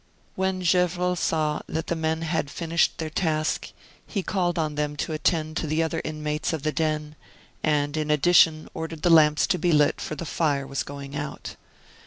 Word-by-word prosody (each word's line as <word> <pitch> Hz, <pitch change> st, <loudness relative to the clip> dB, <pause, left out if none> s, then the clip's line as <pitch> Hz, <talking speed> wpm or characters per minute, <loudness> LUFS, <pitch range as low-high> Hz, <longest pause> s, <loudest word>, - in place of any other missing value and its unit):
When 190 Hz, 0 st, -1 dB
Gevrol 180 Hz, 0 st, +2 dB
saw 155 Hz, -3 st, 0 dB
that 160 Hz, 0 st, -3 dB
the 170 Hz, -, -1 dB
men 160 Hz, 0 st, -1 dB
had 160 Hz, -3 st, -1 dB
finished 170 Hz, +1 st, 0 dB
their 160 Hz, -1 st, -4 dB
task, 155 Hz, -2 st, -1 dB, 0.4 s
he 200 Hz, -4 st, -2 dB
called 180 Hz, -3 st, 0 dB
on 155 Hz, -2 st, 0 dB
them 150 Hz, 0 st, -2 dB
to 150 Hz, +2 st, -3 dB
attend 155 Hz, 0 st, 0 dB
to 160 Hz, -, -2 dB
the 155 Hz, +2 st, +1 dB
other 160 Hz, 0 st, -2 dB
inmates 150 Hz, 0 st, -2 dB
of 155 Hz, -4 st, -3 dB
the 155 Hz, -, +1 dB
den, 155 Hz, -1 st, -1 dB, 0.5 s
and 145 Hz, -1 st, +1 dB
in 155 Hz, -1 st, -2 dB
addition 155 Hz, +1 st, +4 dB
ordered 160 Hz, -1 st, -6 dB
the 175 Hz, -, +4 dB
lamps 150 Hz, -2 st, +6 dB
to 180 Hz, -, 0 dB
be 175 Hz, +2 st, +2 dB
lit 150 Hz, -1 st, +3 dB
for 155 Hz, -, -4 dB
the 170 Hz, -, -6 dB
fire 145 Hz, -4 st, 0 dB
was 140 Hz, -, -3 dB
going 140 Hz, 0 st, -7 dB
out. 145 Hz, -1 st, -5 dB
155 Hz, 190 wpm, -25 LUFS, 150-170 Hz, 0.5 s, lamps